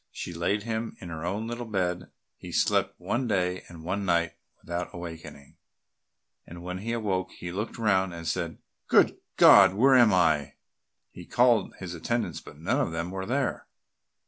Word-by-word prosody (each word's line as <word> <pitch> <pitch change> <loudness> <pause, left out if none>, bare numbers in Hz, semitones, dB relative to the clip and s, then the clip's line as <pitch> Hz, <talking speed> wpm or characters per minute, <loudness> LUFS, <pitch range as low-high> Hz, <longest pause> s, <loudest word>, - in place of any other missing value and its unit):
She 90 - -7
laid 90 +5 -1
him 115 0 -4
in 90 - -9
her 80 -1 -6
own 100 +6 -2
little 120 +1 -5
bed, 90 -4 0
and - - -16 0.2
he - - -10
slept - - +1
one 125 +1 -1
day 90 -3 -1
and 85 -2 -11
one 95 +4 -2
night 85 -2 +1 0.3
without 85 +1 -4
awakening, 80 -5 -9 0.9
and 85 +1 -11
when 90 +1 -5
he 115 +4 -4
awoke 95 -5 -1
he 90 - -7
looked 105 +5 -4
round 95 -5 +2
and 85 -1 -7
said, 85 0 -2 0.3
"Good - - +4 0.2
God! 95 -2 +8
where 130 +6 +5
am 120 -4 +6
I?" 80 -6 +2 0.6
He - - -12
called 120 -4 +3
his 95 -2 -7
attendants, 95 0 -2
but - - -13
none - - 0
of - - -1
them 85 +2 -3
were 95 0 -5
there. 135 +3 -1
95 Hz, 175 wpm, -27 LUFS, 85-110 Hz, 0.9 s, God